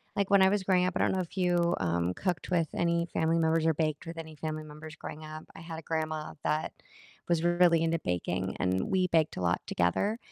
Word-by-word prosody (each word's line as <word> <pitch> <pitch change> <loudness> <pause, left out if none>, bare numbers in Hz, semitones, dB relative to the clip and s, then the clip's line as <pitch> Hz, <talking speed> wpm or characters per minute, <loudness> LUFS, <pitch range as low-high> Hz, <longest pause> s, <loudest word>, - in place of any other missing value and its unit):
like, 200 -1 0
when 200 -1 +6
I 190 - +6
was 200 -1 0
growing 180 -1 +3
up 185 - 0
I - - 0
don't - - +3
know 190 - 0
if 185 +1 -5
you, 175 -2 +2
um, 85 +1 0
cooked 180 - -2
with 170 -3 +2
any 170 0 +1
family 160 +1 +2
members, 160 0 +2
or 160 - +4
baked 155 0 -1
with 165 0 -7
any 160 -1 -8
family 155 0 -4
members 155 +1 -10
growing 155 +1 -8
up, 155 0 -8
I - - -10
had 165 -1 -7
a - - -9
grandma 155 -1 -3
that 155 +1 0 0.6
was 170 -1 +2
really 175 -1 +4
into 165 0 +1
baking, 90 +1 -2
and 95 0 0
we 185 -1 +2
baked 160 -3 +2
a - - -4
lot 85 0 +1
together, 90 - +1
160 Hz, 235 wpm, -30 LUFS, 155-175 Hz, 0.6 s, when